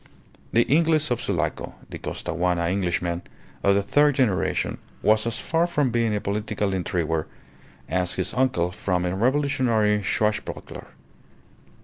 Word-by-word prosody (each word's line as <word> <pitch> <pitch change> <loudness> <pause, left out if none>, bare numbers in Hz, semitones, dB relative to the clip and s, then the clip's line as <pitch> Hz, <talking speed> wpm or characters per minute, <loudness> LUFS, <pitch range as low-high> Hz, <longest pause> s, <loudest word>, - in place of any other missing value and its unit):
The 115 - +4
Inglez 155 0 +2
of 120 - 0
Sulaco, - - -2 0.2
the - - -6
"Costaguana 85 -1 -1
Englishman" 90 -2 -1 0.4
of 100 0 +4
the 100 - +2
third 145 +7 +3
generation, 120 -9 0 0.2
was 110 +1 +3
as 115 - -1
far 165 +1 +1
from 145 -7 +1
being 115 -2 +1
a - - 0
political 105 0 -2
intriguer 85 -4 -1 0.6
as 90 -1 0
his 95 - -1
uncle 120 -9 +1
from 90 -1 -1
a 90 +1 -1
revolutionary 120 -3 +2
swashbuckler. 105 +2 -2
105 Hz, 130 wpm, -24 LUFS, 90-130 Hz, 0.6 s, The